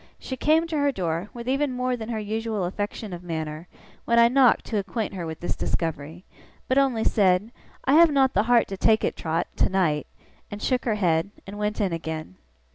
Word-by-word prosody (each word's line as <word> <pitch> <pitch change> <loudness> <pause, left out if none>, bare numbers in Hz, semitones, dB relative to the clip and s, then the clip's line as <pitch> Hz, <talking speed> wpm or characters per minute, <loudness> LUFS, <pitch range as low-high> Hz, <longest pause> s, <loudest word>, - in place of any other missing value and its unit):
She 260 - -6
came 315 +5 +3
to 325 -2 -3
her 285 0 +2
door, 175 -3 -3
with 235 0 -9
even 275 +1 0
more 250 0 -1
than 225 -1 -7
her 230 - -2
usual 215 -1 -2
affection 205 +2 -4
of 175 - -7
manner, 160 -1 -5 0.4
when 235 - +2
I 235 0 +7
knocked 255 -2 +4
to 215 - -1
acquaint 200 +2 -3
her 175 -3 -5
with 160 -1 -7
this 175 - -2
discovery; 165 +1 -3 0.4
but 260 +2 +3
only 255 -5 +1
said, 195 +1 +2 0.3
'I 270 - +3
have 330 +1 +7
not 270 -2 +3
the 200 - +3
heart 240 -2 +5
to 195 - -5
take 220 +2 +3
it, - - 0
Trot, 165 +1 -1
tonight,' 165 -6 +1 0.4
and 205 - -7
shook 250 +3 0
her 225 -3 +1
head, 170 -3 +1 0.2
and 200 +1 -8
went 210 0 -2
in 195 -5 0
again. 160 - -5
210 Hz, 205 wpm, -25 LUFS, 175-245 Hz, 0.4 s, I